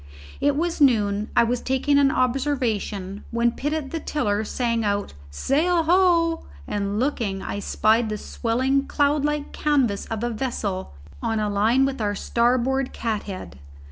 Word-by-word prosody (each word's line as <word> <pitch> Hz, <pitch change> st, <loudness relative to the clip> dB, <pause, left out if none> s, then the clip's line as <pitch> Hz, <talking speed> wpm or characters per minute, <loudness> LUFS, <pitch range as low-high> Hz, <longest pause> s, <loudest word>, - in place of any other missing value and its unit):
It 285 Hz, 0 st, +2 dB
was 335 Hz, +1 st, -1 dB
noon: 210 Hz, -5 st, +3 dB
I -, -, +7 dB
was 240 Hz, +1 st, -1 dB
taking 270 Hz, +2 st, +2 dB
an 280 Hz, -1 st, +5 dB
observation, 240 Hz, -8 st, -1 dB
when 235 Hz, 0 st, +1 dB
Pitt 290 Hz, +5 st, -3 dB
at 305 Hz, -3 st, -3 dB
the 330 Hz, -, -2 dB
tiller 215 Hz, -9 st, -1 dB
sang 230 Hz, 0 st, -1 dB
out 205 Hz, -1 st, -1 dB, 0.2 s
"Sail 320 Hz, -, +1 dB
ho!" 335 Hz, -1 st, +3 dB, 0.2 s
and 200 Hz, 0 st, -2 dB
looking, 230 Hz, -8 st, -1 dB
I 205 Hz, -, -4 dB
spied 220 Hz, +2 st, +2 dB
the 215 Hz, -, -2 dB
swelling 260 Hz, +6 st, 0 dB
cloud 290 Hz, 0 st, +1 dB
like 295 Hz, 0 st, -1 dB
canvas 265 Hz, -9 st, 0 dB
of 225 Hz, 0 st, -4 dB
a 240 Hz, -, -1 dB
vessel 210 Hz, -, -3 dB, 0.3 s
on 225 Hz, -, -1 dB
a 210 Hz, -1 st, -1 dB
line 225 Hz, +6 st, +3 dB
with 270 Hz, -3 st, -3 dB
our 205 Hz, -1 st, 0 dB
starboard 250 Hz, +5 st, +1 dB
cathead. 200 Hz, -, -4 dB
240 Hz, 155 wpm, -24 LUFS, 210-285 Hz, 0.3 s, I